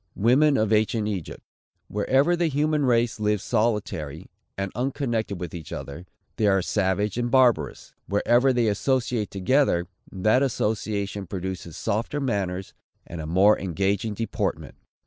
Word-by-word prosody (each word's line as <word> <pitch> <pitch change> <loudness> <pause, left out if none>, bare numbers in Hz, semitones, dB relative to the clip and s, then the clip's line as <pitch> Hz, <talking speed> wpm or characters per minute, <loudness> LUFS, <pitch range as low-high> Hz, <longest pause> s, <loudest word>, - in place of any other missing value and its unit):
WOMEN 135 +7 +4
OF 110 0 +1
ANCIENT 110 0 +1
EGYPT. 95 -7 -5 0.4
Wherever 135 - +2
the 170 -1 +1
human 150 -1 +1
race 120 -2 +2
live 105 -1 +1
solitary, 105 - -2 0.3
and 95 -1 -3
unconnected 120 - -2
with 85 -3 -6
each 85 -3 -8
other, 85 +6 -7 0.3
they 110 - +2
are 95 -2 +3
savage 100 +5 0
and 120 0 -1
barbarous. 125 -1 +2
Wherever 120 +6 +3
they 120 -2 +1
associate 115 0 0
together, 100 -2 +2 0.3
that 110 +7 +2
association 105 -5 -1
produces 90 -3 -5
softer 115 +7 -2
manners 95 -8 -2 0.3
and 85 -1 -7
a 75 - -6
more 95 +6 +4
engaging 100 +3 -1
deportment. 115 0 -3
105 Hz, 135 wpm, -25 LUFS, 95-125 Hz, 0.4 s, WOMEN